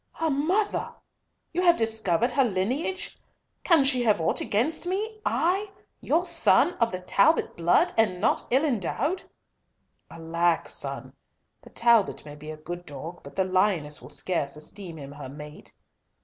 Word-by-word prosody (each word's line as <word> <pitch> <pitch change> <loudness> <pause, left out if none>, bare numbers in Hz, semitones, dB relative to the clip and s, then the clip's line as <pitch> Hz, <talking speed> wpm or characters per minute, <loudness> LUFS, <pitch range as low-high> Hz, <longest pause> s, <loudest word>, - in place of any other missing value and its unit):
"Her 325 -1 -1
mother! 355 +10 0 0.6
You 355 - 0
have 345 -2 +5
discovered 220 - 0
her 270 +2 +3
lineage! 250 - -2 0.4
Can 330 -6 +5
she 265 -2 +3
have 215 -5 +3
ought 160 - 0
against 290 +12 0
me?—I, 390 - -1 0.3
your 335 +4 +1
son, 340 0 +4
sir, - - -15
of 230 -1 +1
the 185 0 -5
Talbot 200 - +2
blood, 170 +1 +3
and 185 -5 +2
not 200 - +1
ill 265 +5 +3
endowed?" 280 - -1 0.9
"Alack, 165 +1 0
son, - - -3 0.5
the - - -15
Talbot 230 -8 +2
may 145 - -9
be 150 +1 -10
a 155 - -6
good 175 +3 -7
dog 155 +5 -8
but - - -12
the 190 - +2
lioness 185 -5 0
will 125 - -12
scarce 150 -3 -2
esteem 165 +3 -8
him 140 -2 -9
her 145 -2 -9
mate. 150 +2 -9
210 Hz, 155 wpm, -26 LUFS, -, 0.9 s, have